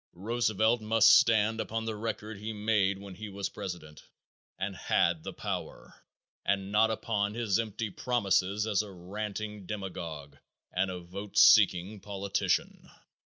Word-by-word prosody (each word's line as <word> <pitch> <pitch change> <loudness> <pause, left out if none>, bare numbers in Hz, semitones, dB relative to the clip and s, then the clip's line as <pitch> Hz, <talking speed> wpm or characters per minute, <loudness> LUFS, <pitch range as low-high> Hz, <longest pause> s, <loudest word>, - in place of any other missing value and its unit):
Roosevelt 110 +3 +1
must 110 +1 +6
stand 110 0 +2
upon 115 0 -3
the 110 -1 -3
record 110 -1 -5
he 110 +2 -5
made 105 -2 +1
when 100 -1 -10
he 105 +3 -8
was 100 -1 -4
president 90 -7 -7 0.6
and 95 +1 -3
had 85 -2 +1
the - - -6
power, - - -6 0.5
and 100 0 -1
not 110 +2 +4
upon 105 -2 -1
his 115 -3 +1
empty 110 -1 -3
promises 100 -3 +1
as 105 -3 +1
a 105 -2 -9
ranting 105 +2 -6
demagogue 85 -8 -6 0.4
and 95 +1 +1
a 90 -1 -5
vote 100 +4 -8
seeking 100 -1 +6
politician. 100 0 -2
105 Hz, 140 wpm, -30 LUFS, 95-110 Hz, 0.6 s, must